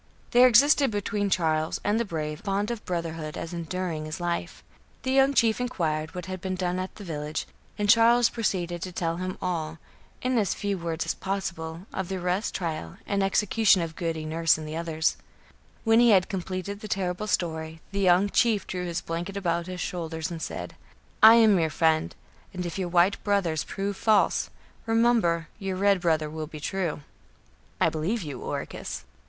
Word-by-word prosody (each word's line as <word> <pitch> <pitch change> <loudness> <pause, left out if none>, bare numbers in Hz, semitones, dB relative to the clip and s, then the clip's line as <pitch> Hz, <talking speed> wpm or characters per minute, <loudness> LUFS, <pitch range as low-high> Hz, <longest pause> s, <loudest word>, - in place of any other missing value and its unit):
There 250 +1 +7
existed 275 +4 +5
between 205 -1 -1
Charles 160 -3 +1
and 210 +2 +1
the 235 - 0
brave 155 -5 -4
a - - -17
bond 200 +2 -1
of 235 -2 -5
brotherhood 165 -3 -4
as 165 - -5
enduring 170 -2 -3
as 155 - -5
life. 175 -1 -3 0.4
The 260 - -1
young 270 +1 +4
chief 230 0 +3
inquired 160 -9 -2
what 180 -1 -5
had 185 0 -6
been 185 0 -2
done 180 0 -1
at 185 0 -5
the 210 - -10
village, 150 -3 -4 0.3
and 205 -1 0
Charles 230 +2 +6
proceeded 175 -6 -2
to 185 - -4
tell 165 -1 -2
him 185 +1 -4
all, 165 -3 -2 0.5
in 255 -1 +2
as 200 -4 0
few 200 -2 -2
words 165 -1 -3
as - - 0
possible, 170 -3 -4
of 190 - -3
the 190 - -3
arrest, 180 +3 -1
trial 155 - -4
and 200 -1 0
execution 195 0 +3
of 160 -1 -6
Goody 165 -3 -3
Nurse 165 +1 +2
and 155 -1 -7
others. 160 -1 0 0.7
When 225 0 +5
he 240 0 +6
had 190 -4 +4
completed 190 +1 -4
the 215 - -7
terrible 190 +1 -2
story, 160 -4 -2
the 200 - -2
young 185 +1 +4
chief 215 0 +2
drew 180 -1 -4
his 170 -1 -2
blanket 175 +4 -4
about 170 -2 -1
his 180 -1 -5
shoulders 165 -2 -4
and 165 -1 -6
said: - - -5 0.5
"I 220 +1 +10
am 220 -5 +6
your 160 -1 +1
friend, 160 0 +1 0.4
and 180 0 -3
if 175 +2 -4
your 180 -2 -2
white 180 +3 +3
brothers 190 -6 +1
prove 200 +1 -3
false, 215 -2 +2 0.4
remember 225 -8 +2
your 195 -2 -3
red 200 0 +3
brother 160 -3 +1
will 155 0 -5
be 155 0 -9
true." 170 -1 -2 0.8
"I - - +4
believe 180 +8 -2
you, 140 -5 -6
Oracus." - - -5
180 Hz, 185 wpm, -27 LUFS, 165-205 Hz, 0.8 s, I